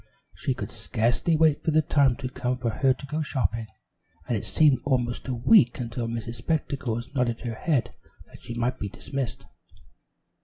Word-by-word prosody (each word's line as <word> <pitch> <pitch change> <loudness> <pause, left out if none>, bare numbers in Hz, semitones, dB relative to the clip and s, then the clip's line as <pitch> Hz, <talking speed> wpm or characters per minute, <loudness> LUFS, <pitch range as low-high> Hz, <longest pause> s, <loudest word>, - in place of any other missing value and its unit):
She - - -2
could - - -5
scarcely 120 +9 +1
wait 155 -2 +3
for - - +1
the 155 0 +4
time 140 -4 +3
to 135 -1 -5
come 125 0 -2
for 120 -2 -1
her 130 +5 +2
to 130 +2 -3
go 150 +3 -2
shopping, 115 - -1 0.6
and 120 - 0
it 105 - -3
seemed 150 -4 +4
almost 125 -4 -1
a 130 - -1
week 120 - +5
until 115 -1 -3
Miss 115 -1 -4
Spectacles 135 -6 -2
nodded 125 -4 0
her 120 -2 -3
head 140 +2 0 0.3
that - - -16
she 120 - -7
might 120 +2 -1
be 100 - -3
dismissed. 135 +4 -5
125 Hz, 180 wpm, -26 LUFS, 120-140 Hz, 0.6 s, week